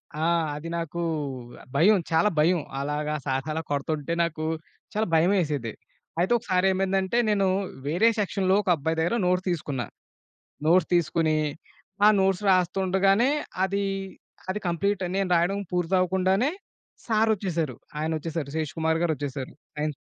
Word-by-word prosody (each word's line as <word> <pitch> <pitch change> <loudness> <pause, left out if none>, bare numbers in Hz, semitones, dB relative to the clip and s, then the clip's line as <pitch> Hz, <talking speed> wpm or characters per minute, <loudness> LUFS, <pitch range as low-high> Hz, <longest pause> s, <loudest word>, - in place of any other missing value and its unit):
ఆ! 155 - -1 0.3
అది 155 +3 -6
నాకు 170 0 -4 0.7
భయం. 200 +8 +5
చాలా 165 +6 +4
భయం. 170 +3 +4 0.2
అలాగా 150 +2 -2
సార్స్ 135 +1 -1
అలా 160 - -2
కొడుతుంటే 145 +2 -1
నాకు 160 -2 -3 0.5
చాలా 215 +1 0
భయమేసేది. 160 - +2 0.5
అయితే 180 +5 +1
ఒకసారి 185 -4 +1
ఏమైందంటే, 190 +2 0
నేను 200 -2 +2 0.4
వేరే 180 +10 +4
సెక్షన్‌లో 195 -2 +1
ఒక 200 - -3
అబ్బాయి 160 +2 -2
దగ్గర 170 +8 +1
నోట్స్ 180 +1 +1
తీసుకున్నా. 145 -7 -2 0.8
నోట్స్ 170 +1 +4
తీసుకొని, 165 -1 +2 0.7
ఆ - - +9
నోట్స్ 190 0 +1
రాస్తుండగానే 190 +5 +3 0.3
అదీ 200 +1 -1 0.6
అది 200 +3 -2
కంప్లీట్ 200 +4 0
నేను 195 -1 0
రాయడం 175 +4 +2
పూర్తవ్వకుండానే 185 - +2 0.6
సారొచ్చేసారు 200 - +1 0.2
ఆయనొచ్చేసారు. 160 -1 -2
శేష్ 155 -3 -2
కుమార్ 160 0 +1
గారొచ్చేసారు. 145 -5 -2 0.3
అయిన్ 150 0 -1
175 Hz, 125 wpm, -26 LUFS, 155-195 Hz, 0.8 s, ఆ